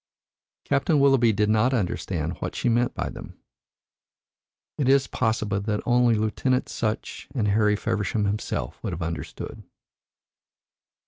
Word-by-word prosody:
Captain 145 +2 +2
Willoughby 135 -4 +5
did 105 0 +1
not 110 +5 +3
understand 90 -5 -2
what - - -4
she - - -1
meant 120 +1 +1
by - - -2
them. - - -9 1.4
It 135 -3 +2
is 135 0 +5
possible 110 -4 -1
that 105 0 -1
only 120 -1 +4
Lieutenant 120 +4 0
Sutch 110 -2 -3
and 105 -5 +1
Harry 105 0 +3
Feversham 105 +1 -1
himself 105 +2 -3
would 95 - -3
have 85 0 -4
understood. 80 0 -6
110 Hz, 130 wpm, -25 LUFS, 105-125 Hz, 1.4 s, Willoughby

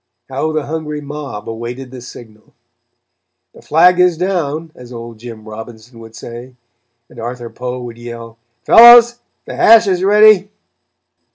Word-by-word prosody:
How 140 +4 -3
the 155 -2 -3
hungry 150 -1 -6
mob 145 -7 -9
awaited 120 +3 -8
the 130 -1 -11
signal! 110 -3 -15 1.0
"The - - -17
flag 175 +3 +3
is 180 -2 +2
down," 165 -3 -3
as 125 -1 -15
old 115 -2 -10
Jim 110 -2 -11
Robinson 110 +2 -12
would 115 0 -14
say, 120 +2 -11 0.5
and 120 - -16
Arthur 120 0 -7
Poe 125 0 -6
would 120 -1 -10
yell: 115 -1 -11 0.3
"Fellows, 240 +1 +7 0.3
the - - -8
hash 225 0 +5
is 185 -2 -1
ready." 205 -1 +4
125 Hz, 145 wpm, -15 LUFS, 115-170 Hz, 1.0 s, Fellows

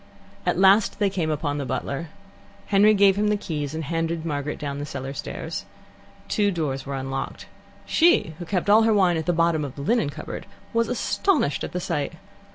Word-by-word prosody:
At - - +2
last 195 +3 +5
they 200 -2 +1
came 175 -5 -1
upon 145 -1 -1
the - - -2
butler. 140 +5 -3 0.6
Henry 210 +2 +5
gave 195 -1 +5
him 210 +1 +2
the 210 0 +2
keys, 150 -6 -4
and 160 - -3
handed 165 +1 -2
Margaret 150 -2 -3
down 145 -1 -4
the 145 - -3
cellar 135 -1 -5
stairs. - - -5 0.6
Two 205 -1 +2
doors 145 -7 -2
were 140 - -3
unlocked. 135 0 -4 0.4
She, 335 - +3
who 175 - -5
kept 180 +1 -1
all 210 +2 +7
her 225 -1 +3
wine 180 -4 +3
at 160 - -4
the - - +4
bottom 165 -2 +2
of 140 -2 -6
the 140 - -6
linen 225 -2 +2
cupboard, - - -7 0.3
was 230 0 +1
astonished 250 - +1
at - - -4
the 180 - -2
sight. 145 -5 -2
165 Hz, 195 wpm, -24 LUFS, 145-200 Hz, 0.6 s, all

